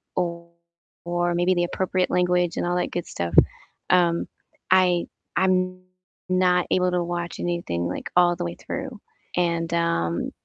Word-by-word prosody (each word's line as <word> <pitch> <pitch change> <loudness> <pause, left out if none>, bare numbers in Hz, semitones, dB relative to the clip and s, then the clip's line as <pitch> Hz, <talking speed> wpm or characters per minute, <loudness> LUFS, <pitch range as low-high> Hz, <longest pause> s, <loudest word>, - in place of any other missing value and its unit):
or 170 -1 -2 0.6
or 175 0 0
maybe 175 +2 +3
the 175 -1 +1
appropriate 185 +1 -1
language 180 -1 +2
and - - 0
all 175 - 0
that - - 0
good 175 - -3
stuff, 85 -1 -4 0.6
um, 170 -2 +3 0.4
I 180 -2 +4 0.3
I'm 185 -1 +1 0.5
not 180 -1 +3
able 180 0 +2
to 175 -1 +1
watch 175 0 -4
anything, 170 - -2
like, - - -5
all 175 -1 +5
the 175 - -3
way 170 0 -4
through. 260 -6 -6 0.4
And, 170 -1 0
um, 85 - 0
175 Hz, 150 wpm, -24 LUFS, 170-180 Hz, 0.6 s, all